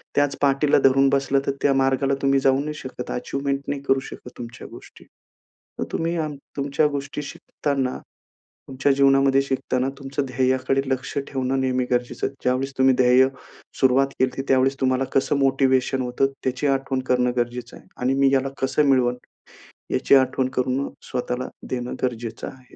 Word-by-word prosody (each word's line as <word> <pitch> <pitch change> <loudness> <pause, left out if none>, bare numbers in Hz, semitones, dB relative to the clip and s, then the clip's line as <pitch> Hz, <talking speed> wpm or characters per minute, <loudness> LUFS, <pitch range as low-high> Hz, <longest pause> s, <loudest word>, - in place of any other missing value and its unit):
त्याच 145 -1 +2
पाटीला 140 +1 +3
धरून 135 0 +4
बसला 135 0 +2
तर - - +1
त्या 140 - +3
मार्गाला 135 0 +1
तुम्ही 135 0 +3
जाऊ 135 0 +3
नाही 150 +2 -3
शकत 130 -4 -8
अचिव्हमेंट 140 +2 -2
नाही 140 -1 -3
करू 135 -1 +2
शकत 130 - -10
तुमच्या 120 0 -8
गोष्टी. - - -14 0.8
तर - - -1
तुम्ही 165 +1 -1
आम 155 -2 -2 0.2
तुमच्या 140 +2 +1
गोष्टी 145 0 -4
शिकताना 140 -2 -3 0.7
तुमच्या 135 +1 +1
जीवनामध्ये 135 0 +4
शिकताना 130 -1 -1
तुमचं 140 0 -3
ध्येयाकडे 130 +1 +1
लक्ष 130 0 -3
ठेवणं 135 -1 -1
नेहमी 130 -1 0
गरजेचं 125 0 -1
आहे. 135 - -9
ज्यावेळेस 130 +2 0
तुम्ही 130 0 +5
ध्येय 125 +1 +5 0.5
सुरुवात 135 +1 +4
केली 130 - +3
होती, 135 - -5
त्यावेळेस 135 +1 +3
तुम्हाला 130 0 +2
कसं 135 +1 +2
मोटिव्हेशन 135 -1 +2
होतं 125 +2 0
त्याची 130 +3 -1
आठवण 135 -1 0
करणं 125 -1 +2
गरजेचं 120 0 -3
आहे. - - -18
आणि 125 +2 0
मी 140 - +5
ह्याला 135 0 +1
कसं 135 +3 +2
मिळवन 125 -2 +3 0.8
याची - - +4
आठवण 130 -1 +2
करण 130 +2 0 0.2
स्वतःला 125 0 -3 0.2
देणं 125 -1 -3
गरजेचं 120 -2 -3
आहे. 130 -1 -13
135 Hz, 160 wpm, -23 LUFS, 130-140 Hz, 0.8 s, तुम्ही